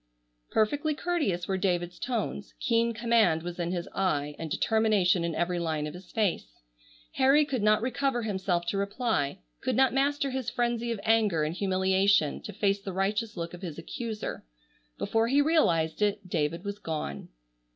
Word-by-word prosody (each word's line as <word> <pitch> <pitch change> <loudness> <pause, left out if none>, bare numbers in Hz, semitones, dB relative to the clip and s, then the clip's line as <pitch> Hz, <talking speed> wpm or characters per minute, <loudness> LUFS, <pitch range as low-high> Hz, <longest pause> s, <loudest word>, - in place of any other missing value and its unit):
Perfectly 290 +8 +1
courteous 295 - -1
were 190 - 0
David's 175 -2 -1
tones, 230 -4 -3
keen 235 -1 +2
command 230 -8 +2
was 175 0 -6
in 175 0 -1
his 175 -2 -3
eye 150 -6 0
and 160 - -4
determination 210 -2 +2
in 170 -1 -2
every 175 0 0
line 160 -3 -1
of 150 - -5
his 180 +1 -12
face. 175 - -2 0.5
Harry 275 +3 +5
could 265 -5 -2
not 215 +1 +3
recover 260 -1 0
himself 190 -4 -1
to 195 +3 -1
reply, 200 - -1 0.2
could 255 - 0
not 265 -1 +4
master 280 +1 +1
his 255 -2 -2
frenzy 240 -1 -1
of 225 - -3
anger 215 -8 +3
and 155 +1 -1
humiliation 190 -3 +2
to - - -7
face 200 0 +1
the 200 - -5
righteous 205 +3 -1
look 170 0 -4
of 175 - -9
his 170 -6 -6
accuser. 225 -3 -5 0.5
Before 225 0 +1
he 275 +4 +3
realized 210 - +2
it, 205 -2 0
David 165 0 -1
was 205 0 -5
gone. 150 - -4
200 Hz, 170 wpm, -28 LUFS, 175-235 Hz, 0.5 s, Harry